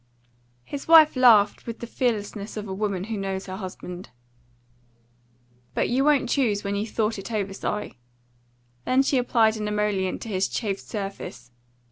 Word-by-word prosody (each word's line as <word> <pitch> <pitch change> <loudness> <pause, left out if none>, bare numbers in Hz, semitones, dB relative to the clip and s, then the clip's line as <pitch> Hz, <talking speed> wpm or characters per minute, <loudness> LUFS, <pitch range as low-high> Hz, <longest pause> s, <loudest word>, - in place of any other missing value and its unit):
His 275 - -7
wife 320 -2 +8
laughed 230 -6 +5
with 230 -1 -5
the - - -7
fearlessness 215 -4 -2
of 210 0 -5
a 190 - -4
woman 195 -2 -2
who 220 +1 -4
knows 195 -1 -3
her 185 0 -6
husband. 185 -2 -8 1.7
"But - - +1
you 260 +3 +2
won't 285 -3 +3
choose 235 -6 +1
when 200 0 -2
you've 210 +2 -2
thought 220 -1 -1
it 195 - -8
over, 200 -3 -2
Si." 210 -7 -4 0.8
Then 260 +1 +3
she 270 -1 +2
applied 225 -3 +2
an 210 -1 -3
emollient 210 -3 -1
to 225 - -7
his 190 -2 0
chafed 200 -4 -3
surface. 195 - -7
210 Hz, 160 wpm, -25 LUFS, 195-235 Hz, 1.7 s, wife